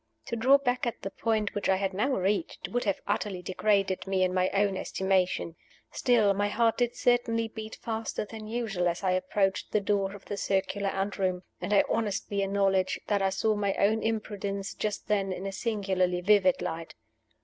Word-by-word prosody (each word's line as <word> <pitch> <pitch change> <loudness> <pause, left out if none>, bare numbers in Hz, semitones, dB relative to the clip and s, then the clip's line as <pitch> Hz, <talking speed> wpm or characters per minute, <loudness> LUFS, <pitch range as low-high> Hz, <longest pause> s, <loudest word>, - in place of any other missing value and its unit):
To - - -3
draw 260 +5 +5
back 250 -3 -1
at 235 - -4
the 195 - -4
point 215 -2 -1
which 205 - -2
I 190 - +5
had 195 0 -1
now 210 +8 0
reached 205 - -1
would 245 0 -1
have 200 -2 0
utterly 200 -3 -2
degraded 195 0 +1
me 190 -1 +2
in 185 0 +1
my 185 0 +2
own 200 -1 +1
estimation. 185 -3 0 0.4
Still, 225 -6 +3
my 205 +1 0
heart 225 +3 +1
did 245 -1 +1
certainly 230 -2 +2
beat 220 0 -8
faster 225 -1 -3
than 215 0 -9
usual 215 -6 -1
as 175 +2 -2
I 185 - +2
approached 190 +1 0
the 210 - +4
door 200 -1 0
of 200 - -13
the 205 - -4
circular 195 +1 0
anteroom; 195 -2 -1 0.2
and - - -3
I 200 - +6
honestly 205 -2 -1
acknowledge 195 -1 +1
that 205 -2 +1
I 195 - +3
saw 215 +3 +1
my 200 -2 0
own 215 +3 +2
imprudence, 205 -3 -3
just 210 -1 -3
then, 200 -2 +1
in 185 +1 -5
a 195 - -2
singularly 190 -4 0
vivid 190 -1 +4
light. 165 0 -5
200 Hz, 190 wpm, -28 LUFS, 190-220 Hz, 0.4 s, I